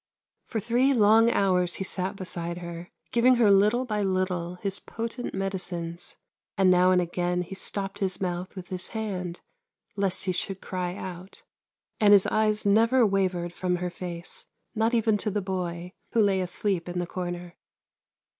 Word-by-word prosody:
For 225 - -2
three 245 +5 +2
long 225 +1 +6
hours 185 -5 +2
he - - -3
sat 190 +1 -2
beside 175 -3 -5
her, 170 0 -7 0.2
giving 250 +2 +5
her 230 -4 +5
little 210 +6 +4
by 210 -3 -1
little 185 -2 -1
his 195 +2 -4
potent 230 0 -5
medicines; 180 -3 -4 0.4
and 190 -1 +5
now 180 0 +5
and 185 -1 +4
again 180 0 -1
he 180 - -9
stopped 195 0 -4
his 190 -2 -1
mouth 180 0 -3
with 185 -2 -8
his 185 -1 -3
hand, 185 -5 -4 0.5
lest 195 -2 0
he 190 - 0
should 190 +1 -3
cry 180 -2 -4
out; 185 -1 -8 0.6
and 205 -1 +6
his 200 -2 +7
eyes 215 -1 +1
never 230 +5 +4
wavered 185 -4 0
from 180 0 -1
her 180 0 -3
face, 175 -1 -7 0.3
not 225 +1 +1
even 220 -2 +3
to 210 - -2
the 205 +1 -1
boy, 180 -2 -4 0.2
who 230 - +2
lay 200 -3 +3
asleep 180 -1 -1
in 175 - -4
the 175 - 0
corner. 175 -1 -5
190 Hz, 165 wpm, -27 LUFS, 180-210 Hz, 0.6 s, his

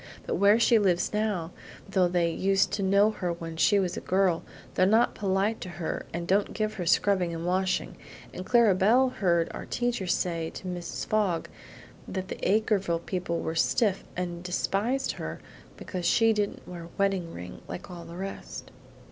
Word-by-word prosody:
But - - -2
where 200 +4 +5
she 235 -1 +5
lives 185 -3 +1
now, 205 -6 -1 0.4
though 190 -2 +3
they 175 -1 +1
used 195 +3 +2
to 205 - -2
know 200 +2 +4
her 180 -5 -3
when 165 -1 -7
she 200 +5 +4
was 185 -3 0
a - - -5
girl, 185 -2 +2 0.3
they're 185 - +3
not 225 +4 +4
polite 200 +2 0
to 185 - -5
her 170 -3 -4
and 170 +1 -4
don't 200 +2 +1
give 215 -1 -1
her 180 -5 -4
scrubbing 180 -1 +2
and 165 +1 -5
washing; 185 +1 0 0.4
and 180 - -6
Clara 235 -1 +5
belle 225 +8 +4
heard 170 -8 +1
our - - -7
teacher 240 -6 -1
say 170 -2 0
to - - -8
Mrs. 175 -1 -4
Fogg 200 -6 0 0.6
that 190 -1 -4
the - - -5
Acreville 195 -4 +1
people 180 -2 -2
were 160 - -2
stiff, 195 +4 +1
and 175 -1 -3
despised 200 +8 0
her - - -6 0.4
because 180 -2 -4
she 225 +3 +4
didn't 205 -1 -2
wear 175 -2 -8
a - - -12
wedding 195 -4 0
ring, 90 - -9
like 90 - -7
all 175 -1 -8
the 170 - -9
rest. 195 +1 -7
190 Hz, 180 wpm, -28 LUFS, 175-205 Hz, 0.6 s, where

